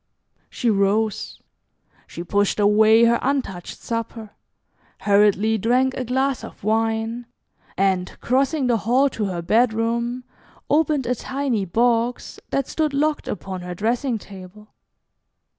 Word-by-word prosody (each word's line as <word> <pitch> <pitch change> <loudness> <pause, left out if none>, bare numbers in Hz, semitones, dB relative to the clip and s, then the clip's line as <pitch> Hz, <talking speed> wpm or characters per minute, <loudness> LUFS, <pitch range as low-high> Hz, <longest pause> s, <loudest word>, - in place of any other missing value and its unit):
She 245 - -3
rose. 205 +2 0 0.7
She 170 - -7
pushed 205 +3 0
away 215 +2 +5
her 235 0 +4
untouched 250 -10 -3
supper, 230 -2 -5 0.7
hurriedly 210 +1 +3
drank 255 +5 +2
a 260 - -3
glass 265 +2 -1
of - - -11
wine, 225 +2 -1 0.5
and, 190 -1 0
crossing 270 +3 +1
the 240 -2 +2
hall 250 +6 +2
to 220 -4 -3
her 175 -3 -4
bedroom, 235 +4 +1 0.5
opened 300 -3 +2
a 250 - +1
tiny 260 -4 -2
box 235 +5 0
that 275 -1 -1
stood 305 -3 -1
locked 300 +1 0
upon 190 -1 -5
her 180 0 -6
dressing 235 +5 -1
table. 200 +1 -13
225 Hz, 125 wpm, -22 LUFS, 205-250 Hz, 0.7 s, away